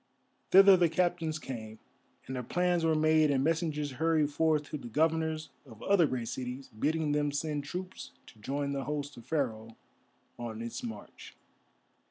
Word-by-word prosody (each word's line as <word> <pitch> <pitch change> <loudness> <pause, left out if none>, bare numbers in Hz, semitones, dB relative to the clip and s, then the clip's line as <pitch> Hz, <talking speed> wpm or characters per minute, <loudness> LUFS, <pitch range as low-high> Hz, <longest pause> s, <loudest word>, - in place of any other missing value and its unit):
Thither 195 +1 +8
the 175 -2 +3
captains 165 -1 0
came, 110 -7 -7 0.5
and 130 - -5
their 125 - -2
plans 175 +6 0
were 160 -1 +3
made 155 0 +4
and 135 -2 +2
messengers 155 -2 0
hurried 155 +1 +1
forth 155 0 +2
to 150 - -2
the 120 - -8
governors 160 +3 0
of 115 -6 -14
other 195 -5 +4
great 125 -4 -3
cities, 130 +2 -5
bidding 150 +7 -1
them 145 0 +1
send 145 0 -2
troops 180 +5 -6 0.2
to 110 - -17
join 140 +5 -2
the 135 -2 -3
host 145 0 -4
of 120 0 -13
Pharaoh 115 -7 -2 0.6
on 115 -2 -5
its 115 - -5
march. 110 -3 -9
150 Hz, 165 wpm, -31 LUFS, 130-160 Hz, 0.6 s, Thither